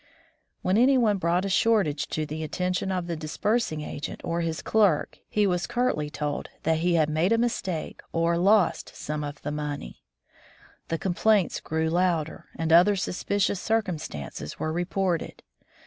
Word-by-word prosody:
When 190 Hz, +4 st, +3 dB
any 265 Hz, +2 st, +5 dB
one 215 Hz, -5 st, +2 dB
brought 175 Hz, +2 st, +1 dB
a -, -, 0 dB
shortage 190 Hz, -7 st, +2 dB
to 155 Hz, -, -2 dB
the 155 Hz, +1 st, -5 dB
attention 180 Hz, +4 st, -1 dB
of 180 Hz, -2 st, -1 dB
the 170 Hz, -1 st, -3 dB
disbursing 160 Hz, +3 st, -1 dB
agent 150 Hz, -1 st, -6 dB
or 170 Hz, 0 st, -1 dB
his 165 Hz, -1 st, -3 dB
clerk, 205 Hz, -8 st, +2 dB
he 210 Hz, -1 st, +2 dB
was 180 Hz, -2 st, 0 dB
curtly 240 Hz, -12 st, 0 dB
told 150 Hz, -1 st, -3 dB
that 160 Hz, -1 st, +2 dB
he 175 Hz, +1 st, +2 dB
had 155 Hz, -2 st, +3 dB
made 160 Hz, +6 st, +1 dB
a 230 Hz, -, +4 dB
mistake 195 Hz, -8 st, -2 dB
or 165 Hz, 0 st, +1 dB
lost 190 Hz, +1 st, +2 dB
some 150 Hz, 0 st, -4 dB
of 145 Hz, 0 st, -6 dB
the 145 Hz, -, -2 dB
money. 150 Hz, -, -5 dB, 0.9 s
The 165 Hz, -, -1 dB
complaints 195 Hz, +2 st, +2 dB
grew 160 Hz, 0 st, -1 dB
louder, 170 Hz, -3 st, 0 dB
and 165 Hz, 0 st, 0 dB
other 180 Hz, +5 st, +7 dB
suspicious 195 Hz, +1 st, -1 dB
circumstances 155 Hz, -, -3 dB
were 155 Hz, 0 st, -2 dB
reported. 175 Hz, 0 st, -1 dB
170 Hz, 160 wpm, -26 LUFS, 155-195 Hz, 0.9 s, other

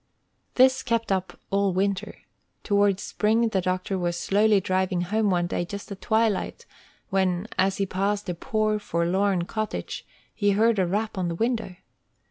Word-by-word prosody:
This 260 Hz, +1 st, +5 dB
kept 230 Hz, -3 st, -1 dB
up 190 Hz, -1 st, -2 dB
all 200 Hz, -1 st, +2 dB
winter. 195 Hz, +1 st, -1 dB, 0.5 s
Toward 200 Hz, -2 st, +2 dB
spring 225 Hz, +3 st, +1 dB
the 195 Hz, -3 st, 0 dB
doctor 185 Hz, +1 st, -1 dB
was 175 Hz, -1 st, -1 dB
slowly 205 Hz, +3 st, +3 dB
driving 185 Hz, -1 st, 0 dB
home 210 Hz, +4 st, +1 dB
one 175 Hz, -2 st, +1 dB
day 175 Hz, -, -2 dB
just 200 Hz, +4 st, -7 dB
at 195 Hz, -, -7 dB
twilight, 220 Hz, -2 st, 0 dB, 0.5 s
when, 190 Hz, 0 st, +1 dB
as 190 Hz, 0 st, +2 dB
he 195 Hz, -, +1 dB
passed 200 Hz, +2 st, -1 dB
a 180 Hz, -, -1 dB
poor, 215 Hz, +2 st, 0 dB
forlorn 185 Hz, 0 st, 0 dB
cottage, 215 Hz, +3 st, -4 dB, 0.3 s
he 205 Hz, -1 st, +2 dB
heard 220 Hz, +1 st, +3 dB
a 185 Hz, -, +2 dB
rap 210 Hz, +2 st, -2 dB
on 180 Hz, -, 0 dB
the 170 Hz, -, -2 dB
window. 225 Hz, -2 st, -1 dB
200 Hz, 160 wpm, -25 LUFS, 185-215 Hz, 0.5 s, This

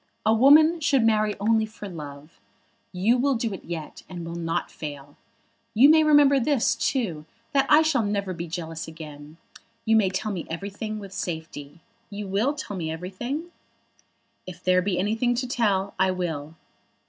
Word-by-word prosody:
A 220 Hz, -, +4 dB
woman 305 Hz, +8 st, +6 dB
should 280 Hz, -5 st, +2 dB
marry 215 Hz, -2 st, +2 dB
only 220 Hz, +1 st, +2 dB
for 215 Hz, -1 st, -9 dB
love. 150 Hz, -3 st, -10 dB, 0.5 s
You 210 Hz, +7 st, +2 dB
will 275 Hz, +1 st, +2 dB
do 230 Hz, -2 st, -2 dB
it 190 Hz, -, -8 dB
yet, 165 Hz, -2 st, -7 dB
and 175 Hz, -2 st, -7 dB
will 165 Hz, -, -6 dB
not 165 Hz, -1 st, -3 dB
fail. 145 Hz, -2 st, -8 dB, 0.6 s
You 260 Hz, +7 st, +7 dB
may 315 Hz, 0 st, +6 dB
remember 290 Hz, -2 st, +5 dB
this 275 Hz, -1 st, +2 dB
too, 175 Hz, -, -2 dB, 0.2 s
that 275 Hz, -2 st, +2 dB
I 305 Hz, +2 st, +7 dB
shall 310 Hz, -6 st, +2 dB
never 200 Hz, -2 st, -2 dB
be 170 Hz, 0 st, -6 dB
jealous 165 Hz, -1 st, -5 dB
again. 155 Hz, -1 st, -11 dB, 0.5 s
You 225 Hz, 0 st, +3 dB
may 210 Hz, -4 st, +4 dB
tell 195 Hz, +3 st, -3 dB
me 180 Hz, -4 st, -5 dB
everything 200 Hz, +5 st, -5 dB
with 200 Hz, -2 st, -9 dB
safety. 160 Hz, -3 st, -6 dB, 0.3 s
You 205 Hz, -1 st, -6 dB
will 215 Hz, +10 st, 0 dB
tell 245 Hz, -8 st, -6 dB
me 165 Hz, -4 st, -3 dB
everything?" 240 Hz, -, -5 dB, 1.0 s
"If 180 Hz, 0 st, -10 dB
there 185 Hz, 0 st, +3 dB
be 185 Hz, -1 st, -1 dB
anything 225 Hz, +5 st, +1 dB
to 255 Hz, +2 st, -2 dB
tell, 200 Hz, -5 st, 0 dB
I 190 Hz, -, +3 dB
will." 165 Hz, -4 st, -4 dB
200 Hz, 170 wpm, -25 LUFS, 165-240 Hz, 1.0 s, You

